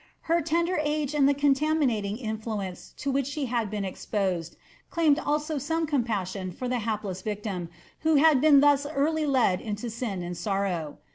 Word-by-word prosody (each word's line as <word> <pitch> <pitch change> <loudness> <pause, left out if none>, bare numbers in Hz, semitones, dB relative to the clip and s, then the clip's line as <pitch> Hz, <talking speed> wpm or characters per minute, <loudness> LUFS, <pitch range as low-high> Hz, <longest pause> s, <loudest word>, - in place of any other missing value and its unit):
Her 335 +1 +1
tender 335 +3 0
age 300 -1 -1
and 280 -2 +4
the 285 - +2
contami* 290 +2 +2
Bating 210 -3 -1
influence 215 -5 -5
to 280 - -2
which 270 -1 0
she 285 0 -3
had 235 -4 -1
been 205 -1 -3
exposed 185 -3 -2 0.3
claimed 315 -3 +3
also 300 0 -1
some 325 +4 -1
com 290 -5 +1
passion 190 -4 -3
for 250 +8 -5
the 250 0 0
hapless 210 -4 -3
victim 205 -4 -4 0.3
who 320 0 +2
had 295 -2 +5
been 290 -2 +7
thus 285 0 +4
early 305 +1 0
led 245 -9 +2
into 215 +2 -4
sin 215 -6 -3
and 175 0 -5
sorrow. 180 -4 -2
250 Hz, 180 wpm, -27 LUFS, 200-295 Hz, 0.3 s, been